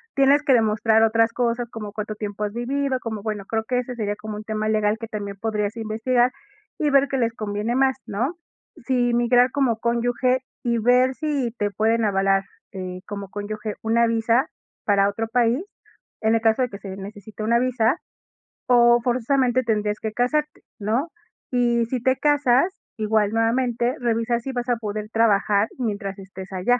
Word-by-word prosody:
Tienes 280 Hz, +2 st, +4 dB
que 280 Hz, -, +4 dB
demostrar 220 Hz, -1 st, +3 dB
otras 225 Hz, +1 st, +3 dB
cosas, 240 Hz, -1 st, -1 dB
como 215 Hz, -2 st, -6 dB
cuánto 215 Hz, 0 st, -5 dB
tiempo 210 Hz, 0 st, -5 dB
has 205 Hz, -, -2 dB
vivido, 260 Hz, +2 st, -1 dB
como, 220 Hz, -3 st, -5 dB
bueno, 210 Hz, -3 st, -3 dB
creo 220 Hz, +2 st, -1 dB
que 250 Hz, +2 st, 0 dB
ese 250 Hz, 0 st, -5 dB
sería 205 Hz, -3 st, -2 dB
como 210 Hz, 0 st, -7 dB
un 210 Hz, -, -7 dB
tema 215 Hz, 0 st, -2 dB
legal 215 Hz, 0 st, +1 dB
que 230 Hz, -, -6 dB
también 200 Hz, -2 st, -5 dB
podrías 210 Hz, -1 st, -1 dB
investigar, 235 Hz, +3 st, +1 dB, 0.5 s
y 300 Hz, -, +2 dB
ver 275 Hz, 0 st, +5 dB
qué 270 Hz, -, -2 dB
les 230 Hz, -2 st, 0 dB
conviene 215 Hz, +2 st, -2 dB
más, 265 Hz, 0 st, +2 dB
¿no? 245 Hz, -, -2 dB, 0.5 s
Sí, 245 Hz, -1 st, +1 dB
migrar 245 Hz, +1 st, +4 dB
como 260 Hz, -5 st, +1 dB
cónyuge, 245 Hz, +2 st, +1 dB, 0.2 s
y 235 Hz, -1 st, +1 dB
ver 250 Hz, +3 st, +3 dB
si 285 Hz, -6 st, -1 dB
te 205 Hz, 0 st, -1 dB
pueden 220 Hz, +3 st, +1 dB
avalar, 195 Hz, -1 st, +2 dB, 0.3 s
eh, 185 Hz, -1 st, -6 dB
como 200 Hz, -1 st, -6 dB
cónyuge 210 Hz, +1 st, -5 dB
una 230 Hz, +1 st, +3 dB
visa 230 Hz, +4 st, +2 dB, 0.4 s
para 200 Hz, -1 st, +3 dB
otro 225 Hz, +3 st, -3 dB
país, 240 Hz, +5 st, +1 dB, 0.6 s
en 220 Hz, +1 st, +3 dB
el 225 Hz, -, +1 dB
caso 225 Hz, +2 st, +3 dB
de 250 Hz, -, +1 dB
que 200 Hz, -, -8 dB
se 195 Hz, -1 st, -7 dB
necesite 205 Hz, +2 st, -8 dB
una 235 Hz, +2 st, +3 dB
visa, 250 Hz, +1 st, +1 dB, 0.7 s
o 240 Hz, -1 st, +6 dB
forzosamente, 255 Hz, +1 st, +2 dB
tendrías 210 Hz, -2 st, 0 dB
que 220 Hz, -1 st, -4 dB
casarte, 300 Hz, +6 st, 0 dB, 0.2 s
¿no? 225 Hz, +10 st, 0 dB, 0.4 s
Y 240 Hz, -2 st, +2 dB
si 245 Hz, +1 st, -3 dB
te 260 Hz, +2 st, +2 dB
casas, 290 Hz, +3 st, +3 dB, 0.2 s
igual, 215 Hz, -1 st, +1 dB
nuevamente, 235 Hz, +1 st, +1 dB
revisa 235 Hz, 0 st, 0 dB
si 265 Hz, +3 st, -5 dB
vas 245 Hz, -1 st, -3 dB
a 240 Hz, -, +2 dB
poder 215 Hz, -1 st, -5 dB
trabajar 210 Hz, -2 st, +3 dB
mientras 205 Hz, -5 st, -3 dB
estés 190 Hz, 0 st, -10 dB
allá. 215 Hz, +7 st, +2 dB
230 Hz, 175 wpm, -23 LUFS, 210-250 Hz, 0.7 s, o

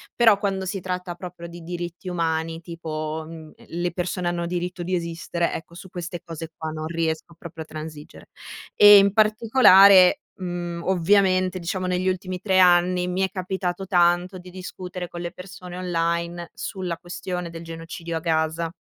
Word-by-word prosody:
Però 225 Hz, -4 st, +6 dB
quando 195 Hz, -2 st, -2 dB
si 195 Hz, +1 st, -3 dB
tratta 180 Hz, -1 st, -4 dB
proprio 175 Hz, -1 st, -9 dB
di 170 Hz, 0 st, -11 dB
diritti 175 Hz, +1 st, -6 dB
umani, 165 Hz, -1 st, -1 dB
tipo, 160 Hz, -2 st, -5 dB
mhmm, 160 Hz, -1 st, -10 dB, 0.2 s
le 175 Hz, +1 st, -2 dB
persone 180 Hz, 0 st, -2 dB
hanno 175 Hz, 0 st, -1 dB
diritto 175 Hz, +1 st, -3 dB
di 185 Hz, +2 st, -3 dB
esistere, 170 Hz, 0 st, -2 dB
ecco, 170 Hz, -, -7 dB
su 190 Hz, +2 st, -11 dB
queste 175 Hz, -1 st, -6 dB
cose 165 Hz, -1 st, -7 dB
qua 160 Hz, -1 st, -5 dB
non 155 Hz, 0 st, -5 dB
riesco 165 Hz, 0 st, -2 dB
proprio 165 Hz, -1 st, -8 dB
a -, -, -21 dB
transigere. 155 Hz, -1 st, -9 dB, 0.5 s
E 205 Hz, 0 st, +10 dB
in 200 Hz, 0 st, +5 dB
particolare, 215 Hz, -1 st, +6 dB, 0.2 s
mhmm, 175 Hz, -2 st, -4 dB
ovviamente 185 Hz, 0 st, +2 dB
diciamo 185 Hz, +2 st, -3 dB
negli 180 Hz, +1 st, 0 dB
ultimi 185 Hz, -1 st, -4 dB
3 190 Hz, -2 st, +2 dB
anni 180 Hz, 0 st, +4 dB
mi 180 Hz, +1 st, -1 dB
è 190 Hz, -, +2 dB
capitato 185 Hz, 0 st, -3 dB
tanto 175 Hz, +1 st, +2 dB
di 180 Hz, 0 st, -12 dB
discutere 180 Hz, -1 st, -7 dB
con 175 Hz, 0 st, -8 dB
le 175 Hz, 0 st, -4 dB
persone 180 Hz, -1 st, -10 dB
online 170 Hz, -1 st, -2 dB
sulla 180 Hz, -3 st, -4 dB
questione 180 Hz, 0 st, -5 dB
del 165 Hz, 0 st, -9 dB
genocidio 165 Hz, 0 st, -6 dB
a -, -, -2 dB
Gaza. 160 Hz, 0 st, 0 dB
175 Hz, 165 wpm, -24 LUFS, 170-185 Hz, 0.5 s, E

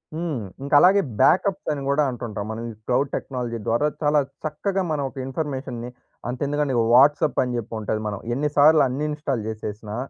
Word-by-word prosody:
హ్మ్. 160 Hz, -5 st, -2 dB, 0.2 s
ఇంక 140 Hz, -, -6 dB
అలాగే 195 Hz, +4 st, +6 dB, 0.2 s
బ్యాకప్స్ 195 Hz, +1 st, +3 dB
అని 145 Hz, -2 st, -3 dB
కూడా 145 Hz, +2 st, +3 dB
అంటుంటాం. 110 Hz, -4 st, -5 dB
మనం 110 Hz, +1 st, -5 dB
ఈ -, -, -10 dB
క్లౌడ్ 130 Hz, +2 st, +1 dB
టెక్నాలజీ 120 Hz, -3 st, -4 dB
ద్వారా 120 Hz, +7 st, +2 dB
చాలా 150 Hz, 0 st, +3 dB, 0.3 s
చక్కగా 190 Hz, +6 st, -1 dB
మనం 145 Hz, -2 st, -1 dB
ఒక 135 Hz, -, -18 dB
ఇన్ఫర్మేషన్‌ని 130 Hz, -4 st, -4 dB, 0.4 s
అంత 125 Hz, -, -4 dB
ఎందుకండి 145 Hz, -2 st, 0 dB, 0.2 s
వాట్సాప్ 145 Hz, +2 st, +5 dB
అని 125 Hz, -1 st, -3 dB
చెప్పి 115 Hz, 0 st, -6 dB
ఉంటది 110 Hz, 0 st, -2 dB
మనం. 100 Hz, -2 st, -4 dB, 0.2 s
ఎన్ని 150 Hz, +2 st, 0 dB
సార్లు 150 Hz, +1 st, +7 dB
అన్‌ఇన్‌స్టాల్ 145 Hz, -3 st, -2 dB
చేసేసినా 105 Hz, 0 st, -6 dB
140 Hz, 165 wpm, -23 LUFS, 120-150 Hz, 0.4 s, సార్లు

